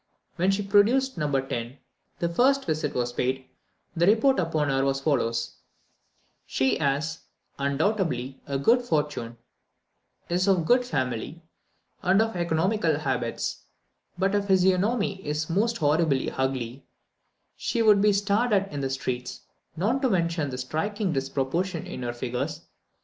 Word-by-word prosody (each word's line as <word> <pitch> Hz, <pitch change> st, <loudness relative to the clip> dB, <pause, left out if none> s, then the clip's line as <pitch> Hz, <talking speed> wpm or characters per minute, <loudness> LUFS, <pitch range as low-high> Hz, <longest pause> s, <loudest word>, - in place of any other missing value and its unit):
When 185 Hz, +3 st, +1 dB
she 195 Hz, +1 st, +1 dB
produced 225 Hz, +7 st, +3 dB
No. 150 Hz, -1 st, 0 dB
10, 135 Hz, -1 st, 0 dB
and 120 Hz, +3 st, -4 dB, 0.4 s
the 170 Hz, -, 0 dB
first 265 Hz, +11 st, +2 dB
visit 155 Hz, -2 st, -2 dB
was 120 Hz, -1 st, -1 dB
paid, 130 Hz, +1 st, -1 dB, 0.5 s
the 170 Hz, +1 st, +2 dB
report 230 Hz, +6 st, +4 dB
upon 160 Hz, -4 st, 0 dB
her 135 Hz, 0 st, +1 dB
was 135 Hz, 0 st, +1 dB
as 135 Hz, -, -9 dB
follows: 115 Hz, -6 st, 0 dB, 0.9 s
"She 130 Hz, 0 st, +1 dB
has, 150 Hz, +2 st, 0 dB, 0.4 s
undoubtedly, 140 Hz, -, -1 dB
a 140 Hz, -1 st, -1 dB
good 230 Hz, -, +4 dB
fortune, 150 Hz, -, -2 dB, 0.9 s
is 180 Hz, +3 st, 0 dB
of 185 Hz, -4 st, +3 dB
good 245 Hz, +7 st, +4 dB
family, 130 Hz, -, -3 dB, 0.6 s
and 190 Hz, +2 st, +3 dB
of 225 Hz, -1 st, +1 dB
economical 170 Hz, 0 st, +1 dB
habits: 130 Hz, -5 st, -2 dB, 0.5 s
but 195 Hz, +2 st, +1 dB
her 205 Hz, -, +3 dB
physiognomy 195 Hz, +2 st, +2 dB
is 150 Hz, +2 st, -2 dB
most 225 Hz, +6 st, +1 dB
horribly 150 Hz, -2 st, +1 dB
ugly; 130 Hz, -1 st, -3 dB, 0.7 s
she 230 Hz, -, -1 dB
would 210 Hz, -2 st, +6 dB
be 210 Hz, 0 st, +5 dB
stared 205 Hz, +4 st, +1 dB
at 195 Hz, -4 st, +1 dB
in 145 Hz, -, -3 dB
the 135 Hz, -, -1 dB
streets, 125 Hz, -2 st, -4 dB, 0.4 s
not 225 Hz, +10 st, +1 dB
to 260 Hz, -, +2 dB
mention 170 Hz, -6 st, 0 dB
the 125 Hz, -, -5 dB
striking 180 Hz, -, -2 dB
disproportion 140 Hz, +6 st, -2 dB
in 130 Hz, -, -6 dB
our 120 Hz, 0 st, -2 dB
figures. 125 Hz, 0 st, -3 dB
160 Hz, 145 wpm, -26 LUFS, 135-200 Hz, 0.9 s, would